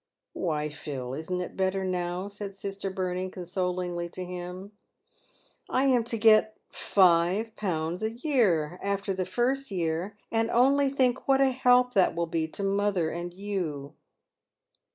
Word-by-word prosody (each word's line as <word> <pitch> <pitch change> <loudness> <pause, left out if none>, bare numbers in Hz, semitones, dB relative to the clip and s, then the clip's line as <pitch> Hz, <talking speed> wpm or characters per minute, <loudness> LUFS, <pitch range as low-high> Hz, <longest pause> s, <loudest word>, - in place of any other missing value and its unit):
" - - -61
Why, 150 -4 -1
Phil, 135 -4 -6
isn't 170 +5 -3
it 180 - -6
better 190 0 0
now," 180 +1 -2
said 200 -1 -7
sister 195 0 -5
Bertie, 185 0 -2
consolingly 180 -1 -3
to 180 +1 -6
him. 180 +2 -7 0.5
" - - -28 0.3
I 260 - +2
am 250 -3 +4
to 230 -1 -2
get 215 0 +5
51. 180 -2 +2
a 220 - +1
year, 220 - +1
after 200 0 -1
the 185 -1 -2
first 255 +8 0
year, 175 +2 -2
and 225 0 +1
only 275 +3 +4
think 260 -2 +1
what 270 -1 +4
a 270 -1 +4
help 250 -1 +4
that 190 -6 +3
will 170 0 0
be 165 -1 -1
to 200 - -6
mother 195 -4 +1
and 175 +1 -5
you." 175 -7 -4
190 Hz, 155 wpm, -28 LUFS, 175-220 Hz, 0.5 s, get